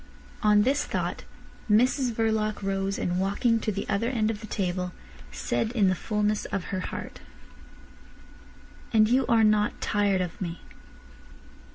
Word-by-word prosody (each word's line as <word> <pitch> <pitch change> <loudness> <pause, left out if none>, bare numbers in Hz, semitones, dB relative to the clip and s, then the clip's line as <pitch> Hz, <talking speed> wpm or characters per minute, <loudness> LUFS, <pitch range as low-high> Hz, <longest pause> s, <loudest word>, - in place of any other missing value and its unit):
On 210 -1 +5
this 275 +5 +2
thought - - -3 0.4
Mrs 250 +4 +3
Verloc 220 -2 0
rose, 195 0 -1
and 180 0 -1
walking 205 +4 +1
to 220 - -1
the 200 0 -4
other 215 +3 0
end 225 -4 +1
of 215 -1 -7
the 215 - -8
table, 180 -2 -2 0.4
said 225 - -1
in 205 -6 +3
the - - +3
fulness 210 +2 -1
of 195 - -3
her 190 - 0
heart: - - -6 1.7
"And 215 -1 +5
you 255 +2 +2
are 230 -1 +4
not 210 -1 +2
tired 200 -2 +1
of 180 0 -5
me." 170 -2 -4
210 Hz, 150 wpm, -27 LUFS, 195-225 Hz, 1.7 s, On